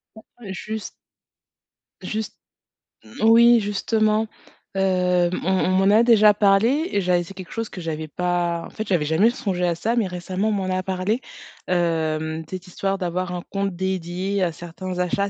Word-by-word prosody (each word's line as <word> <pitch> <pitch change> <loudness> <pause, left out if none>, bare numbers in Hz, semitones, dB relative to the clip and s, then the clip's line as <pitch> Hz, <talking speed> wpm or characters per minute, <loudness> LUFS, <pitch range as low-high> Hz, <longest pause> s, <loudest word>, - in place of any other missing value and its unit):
Ouais 220 - -13 0.3
et - - -4
juste 215 +3 -5 1.1
juste 215 -1 -4 0.9
moui 235 +2 +7
justement, 215 +1 +1 0.5
heu, 180 -2 +2
on 185 - 0
on 190 -1 +2
m'en 190 +1 +3
a 225 - +6
déjà 215 -3 +6
parlé 220 - +3
et 200 - +1
j'avais 180 -1 +2
c'est 185 - -11
quelque 185 -2 -10
chose 225 0 -3
que 180 - -8
j'avais 160 -1 -4
pas 175 +1 -1
en - - -10
fait 220 -1 -6
j'avais 175 -5 +1
jamais 160 +9 +4
songé 195 -8 -2
à 170 -1 +1
ça, 225 +8 -1
mais 220 -4 +2
récemment, 185 +3 -2
on - - +1
m'en 190 -2 -2
a 185 - -1
parlé, 190 +4 -1 0.5
heu, 160 -2 0
cette 185 0 -7
histoire 195 +2 -2
d'avoir 180 -1 -2
un 175 -1 -4
compte 195 -2 -2
dédié 190 +1 -2
à 175 - +1
certains 180 +2 -7
achats. 200 +3 0
185 Hz, 175 wpm, -23 LUFS, 175-210 Hz, 1.1 s, moui